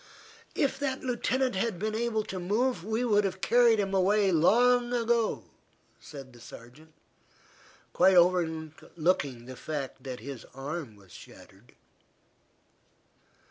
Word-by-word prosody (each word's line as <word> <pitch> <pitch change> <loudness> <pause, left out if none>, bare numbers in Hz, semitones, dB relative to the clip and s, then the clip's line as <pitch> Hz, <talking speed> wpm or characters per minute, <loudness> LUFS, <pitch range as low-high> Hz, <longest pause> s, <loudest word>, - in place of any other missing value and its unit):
"If 275 -1 0
the 275 -2 -1
Lieutenant 255 +1 -1
had 195 0 -1
been 215 +4 -3
able 220 -1 -1
to 190 -2 -6
move, 205 +2 0
we 220 +4 -1
would 210 -3 +3
have 190 -1 -3
carried 235 0 +4
him 195 -1 -1
away 195 +1 +3
long 240 +9 +3
ago," 235 -1 0 0.6
said 135 -4 -11
the 120 - -16
sergeant, 125 +7 -14 1.0
quite 185 +1 +4
overlooking 160 -5 0
the 130 +1 -9
fact 145 -1 -6
that 130 -2 -7
his 130 +1 -8
arm 140 -3 -6
was 95 -3 -20
shattered. 100 +7 -16
185 Hz, 125 wpm, -28 LUFS, 145-230 Hz, 1.0 s, carried